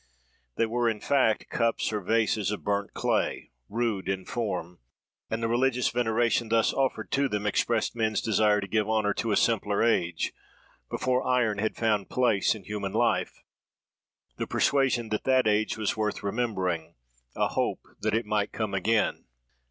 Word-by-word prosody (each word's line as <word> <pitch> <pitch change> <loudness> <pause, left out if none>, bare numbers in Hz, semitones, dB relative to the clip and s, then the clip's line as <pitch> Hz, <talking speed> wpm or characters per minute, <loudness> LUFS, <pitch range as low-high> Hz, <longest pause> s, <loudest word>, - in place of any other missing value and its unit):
"They 115 - +2
were, 120 +1 +1
in 110 -2 -3
fact, 130 -5 +1
cups 115 -1 0
or 105 - -1
vases 110 -1 +1
of 105 - -4
burnt 100 0 -1
clay, - - -1 0.2
rude 110 -4 -1
in 95 -1 -2
form: 90 -7 -3 0.5
and 110 +1 -2
the - - +2
religious 125 +1 +2
veneration 120 0 +1
thus 115 -1 +3
offered 135 -1 -1
to 140 0 +2
them 105 0 -2
expressed 110 +2 0
men's 110 -2 0
desire 105 -1 +2
to 100 - -5
give 110 0 0
honour 110 -2 +2
to 115 - -2
a 100 - +3
simpler 105 -3 +2
age, 90 -7 +1 0.6
before 130 0 0
iron 120 -5 +2
had 110 +1 -1
found 105 -4 0
place 120 -5 +2
in 105 - -10
human 100 -1 -4
life: 120 +2 0 0.9
the - - -3
persuasion 130 -5 +1
that 105 0 -2
that 130 -1 +3
age 110 +1 +1
was 110 -2 -1
worth 105 -1 -2
remembering: 95 -7 -2 0.4
a - - +1
hope - - -2
that 110 0 0
it 115 0 0
might 105 -1 0
come 110 -3 -3
again. 105 +3 +1
110 Hz, 165 wpm, -27 LUFS, 105-115 Hz, 0.9 s, thus